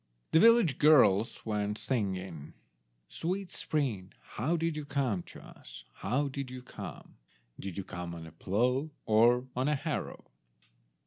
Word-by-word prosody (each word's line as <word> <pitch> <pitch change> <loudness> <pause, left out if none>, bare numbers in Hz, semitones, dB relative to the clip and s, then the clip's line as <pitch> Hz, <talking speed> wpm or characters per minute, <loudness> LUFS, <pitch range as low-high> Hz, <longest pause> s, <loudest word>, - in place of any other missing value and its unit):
The 160 - +6
village 230 - +5
girls 125 -8 +5
went 105 -1 -1
singing— 95 - -3 0.5
"Sweet 185 +2 -3
spring, 115 -12 -2 0.2
how 155 +10 0
did 165 -1 -1
you 150 - -4
come 135 -9 -1
to - - -11
us? - - -12
How 130 +8 -1
did 140 -1 -5
you 130 0 -8
come? - - -9 0.4
Did 95 -2 -6
you 100 - -2
come 85 -1 -6
on 80 -1 -8
a 80 - -11
plough, 125 - 0 0.2
or 120 +3 +4
on 130 +2 0
a 150 - +2
harrow?" 135 - -4
125 Hz, 145 wpm, -31 LUFS, 100-145 Hz, 0.5 s, The